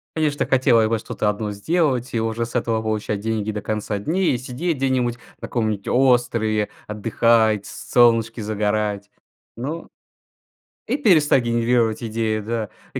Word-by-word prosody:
Конечно, 150 -2 0
так - - 0
хотелось 125 -4 +4
бы 115 +1 +1
что-то 105 -1 -2
одно 105 0 -3
сделать 130 - 0
и 115 - +1
уже 115 +1 -1
с 115 - -11
этого 115 -2 0
получать 110 -1 -2
деньги 110 0 -2
до 105 0 -4
конца 105 0 -3
дней, 170 - +1
и - - 0
сидеть 135 +7 -3
где-нибудь 130 -3 0 0.2
на - - -6
каком-нибудь 110 -4 -2
острове, 120 -5 +2 0.2
отдыхать, 110 0 +2
с - - -10
солнышке 115 -1 +4
загорать, 105 -1 -1 0.5
но 145 +8 -5 1.0
и - - -1
перестать 155 - +4
генерировать 115 -1 +1
идеи, 110 -1 -1
да, 110 0 -3 0.2
а - - -3
115 Hz, 150 wpm, -22 LUFS, 110-125 Hz, 1.0 s, хотелось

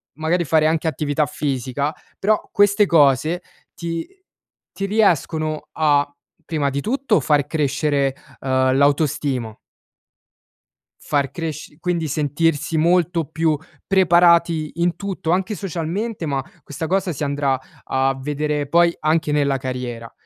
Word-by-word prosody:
magari 160 +4 0
fare 155 0 +2
anche 160 0 0
attività 150 -1 0
fisica, 140 0 -2 0.2
però 215 +2 0
queste 205 +1 +4
cose 155 +2 +3 0.3
ti 165 -1 -4 0.7
ti 195 - -3
riescono 165 -7 +1
a, 145 -2 +2 0.4
prima 150 -3 0
di 140 +1 -2
tutto, 255 -2 +1
far 145 -2 +2
crescere, 145 -2 0 0.3
uhm, 130 0 +2
l'autostimo 140 -5 +1 1.4
far 140 -2 0
cresc 155 -3 -6
quindi 170 -2 -1
sentirsi 155 +2 0
molto 170 0 +2
più 160 0 0 0.3
preparati 170 -4 +4
in 175 0 +1
tutto, 190 -4 -4
anche 190 +4 0
socialmente, 190 +2 -3
ma 140 -2 -1 0.2
questa 145 +3 -5
cosa 190 0 0
si 150 - -6
andrà 140 -2 0 0.2
a 135 0 0
vedere 150 +1 -2
poi 170 +3 +3
anche 155 0 +1
nella 140 -2 +2
carriera. 125 -3 -5
155 Hz, 120 wpm, -21 LUFS, 140-170 Hz, 1.4 s, queste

